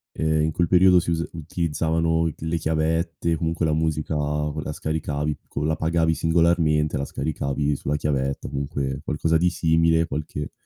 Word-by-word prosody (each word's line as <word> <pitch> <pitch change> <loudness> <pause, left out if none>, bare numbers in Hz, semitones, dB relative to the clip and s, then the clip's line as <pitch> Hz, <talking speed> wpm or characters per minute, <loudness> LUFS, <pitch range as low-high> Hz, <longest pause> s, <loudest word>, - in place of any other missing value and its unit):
ehm, 80 -1 +1
in 80 - +1
quel 85 +2 +1
periodo 90 +1 +6
si 85 - -2
usa 85 0 0
utilizzavano 80 0 0
d - - -9
le 80 +1 0
chiavette, 80 +1 0
comunque 80 +1 -1
la 80 - +1
musica 80 0 -1
co 75 +1 -1
la 75 - -4
scaricavi 75 -1 -2
co 70 - -4
la 80 +1 +1
pagavi 80 0 +1
singolarmente, 80 -2 +2
la 70 - -2
scaricavi 70 -1 -2
sulla 70 +2 -2
chiavetta, 70 -2 -1
comunque 70 -1 -3
qualcosa 80 +2 +1
di 90 +2 +3
simile, 80 -1 +2
qualche 75 -1 -4
80 Hz, 165 wpm, -24 LUFS, 75-80 Hz, -, periodo